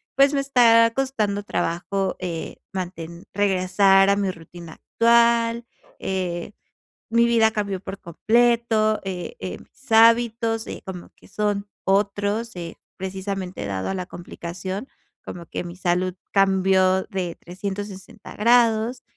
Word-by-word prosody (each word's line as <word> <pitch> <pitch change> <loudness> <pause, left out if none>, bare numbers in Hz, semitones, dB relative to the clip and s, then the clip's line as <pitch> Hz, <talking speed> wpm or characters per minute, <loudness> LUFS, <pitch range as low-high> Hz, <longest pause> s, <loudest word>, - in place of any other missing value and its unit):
pues 275 +1 +5
me 275 - +1
está 230 -4 +5
costando 215 -7 -1
trabajo, 190 +2 -2
eh, 170 -3 -5 0.2
manten 175 -1 -6
regresar 195 0 +4
a 200 - +4
mi 200 -2 0
rutina 165 -1 -12
actual. 235 0 +2 0.3
Eh, 185 0 -3 0.6
mi 235 0 +4
vida 225 -2 +4
cambió 200 -3 -3
por 195 - -7
completo, 225 +3 +2
eh, 185 - -5
eh, - - -5
mis 265 - -20
hábitos, 225 0 +4
eh, - - -7
como 180 -2 -8
que - - -20
son 205 -1 -2 0.2
otros, 205 +3 0
eh, 170 -1 -7 0.2
precisamente 190 - -5
dado 95 -1 -3
a - - -2
la 180 -1 -4
complicación, 185 +5 -7 0.4
como 170 -2 -8
que - - -5
mi 175 0 -8
salud 180 0 0 0.2
cambió 190 -1 +3
de 180 -3 -4
360 195 +1 -7
grados, 235 +1 +3
195 Hz, 130 wpm, -23 LUFS, 185-230 Hz, 0.6 s, pues